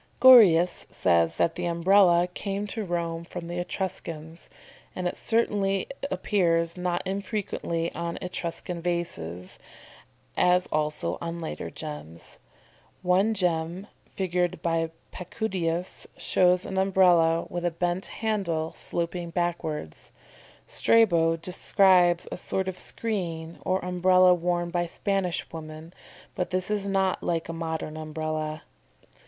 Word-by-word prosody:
"] - - -34
Gorius 200 -10 +7
says 85 -2 +2
that 165 - +1
the 175 +1 -3
Umbrella 175 0 +4
came 200 +1 -3
to 215 +1 -4
Rome 170 -2 -3
from 170 0 -7
the 175 +1 -4
Etruscans, 170 -3 -5 0.5
and 180 -1 -1
certainly 205 -4 +1
it 275 +5 -8
appears 170 -3 +1
not 180 -1 -2
infrequently 190 -4 -3
on 170 0 -4
Etruscan 175 -1 -5
vases, 95 - -4 0.8
as 180 0 +3
also 150 - -1
on 170 0 -4
later 160 - -5
gems. 150 - -9 0.6
One 190 +5 +3
gem, 175 0 -1 0.3
figured 180 -2 -1
by 165 -1 0 0.2
Pacudius, 180 -3 -3
shows 180 0 +3
an 190 - -2
Umbrella 175 -4 +4
with 175 0 -5
a 175 - +2
bent 175 +2 -2
handle, 185 -8 -2
sloping 170 0 -3
backwards. 165 - -3 0.6
Strabo 170 -8 +3
describes 180 0 +3
a - - -4
sort 190 +1 -2
of 185 -1 -4
screen 170 -7 -4
or 185 0 0
Umbrella 180 0 +5
worn 175 0 -1
by 175 -1 0
Spanish 190 0 -1
women, 160 +1 -9 0.4
but 180 - -2
this 185 +2 -1
is 205 -1 -1
not 190 -1 +1
like 165 -1 -1
a - - -3
modern 160 -2 -4
Umbrella. 155 0 -4
175 Hz, 125 wpm, -26 LUFS, 165-185 Hz, 0.8 s, Gorius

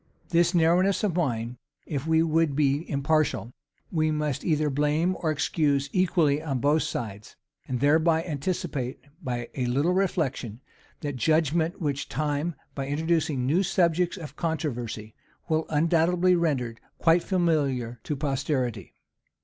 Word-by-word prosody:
This 175 +1 +3
narrowness 175 +5 +3
of 195 -6 0
mind, 120 -7 -1 0.3
if 145 0 -4
we 160 0 +4
would 160 -2 +1
be 145 +2 +1
impartial, 140 -4 0 0.4
we 155 -2 +1
must 150 -3 -1
either 155 -2 +1
blame 150 +6 +1
or 165 - -1
excuse 145 -2 0
equally 170 -6 +2
on 145 -4 -2
both 145 +5 +2
sides; 110 -8 -5 0.3
and 125 -2 -2
thereby 160 +4 +3
anticipate, 145 -5 -3 0.3
by 120 -3 -3
a 125 -2 -1
little 140 +8 +2
reflection, 150 - -1 0.4
that 145 -4 -3
judgment 160 - +1
which 145 -4 -2
time, 150 +2 -1 0.2
by 135 -1 -4
introducing 155 -2 0
new 160 +8 +3
subjects 180 -1 +1
of 160 -5 -8
controversy, 120 -10 -3 0.3
will 160 -1 0
undoubtedly 170 +3 +3
render 135 -9 0 0.2
quite 165 +1 +4
familiar 145 - 0
to 150 - -2
posterity. 135 -3 -2
155 Hz, 135 wpm, -26 LUFS, 135-165 Hz, 0.4 s, we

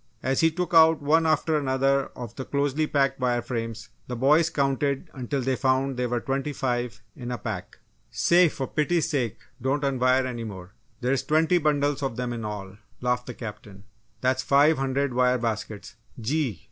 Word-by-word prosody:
As 130 +1 +1
he 165 - +5
took 175 +1 -3
out 160 -1 +7
one 160 +3 +3
after 155 0 +2
another 135 0 +1
of 120 -2 -7
the 135 - -5
closely 145 +2 0
packed 135 -2 +1
wire 120 -2 0
frames 115 -2 -5 0.2
the 125 - -4
boys 150 +7 +4
counted 140 -2 -1
until 135 +1 -3
they 130 +1 +1
found 130 +1 +1
there 125 0 -1
were 120 0 0
twenty 135 +4 -2
five 120 -2 -2
in 120 -1 -7
a 125 - -2
pack. 105 -7 -6 0.3
"Say, 175 0 +4
for 135 - -4
pity's 155 +4 0
sake 125 -7 -1 0.2
don't 140 +3 0
unwire 130 -1 +2
any 120 -2 -4
more 95 -4 -8 0.3
there's 130 +2 +1
twenty 160 +3 +2
bundles 145 -2 +1
of 135 -4 -2
them 125 0 -3
in 115 -1 -5
all," 100 -2 -6 0.2
laughed 125 0 -1
the 125 - -6
Captain. 105 -3 -9 0.4
"That's 130 0 +1
five 145 +3 +4
hundred 135 0 0
wire 125 0 +3
baskets! 110 -2 -4 0.2
Gee! 125 - -1
130 Hz, 180 wpm, -26 LUFS, 120-145 Hz, 0.4 s, out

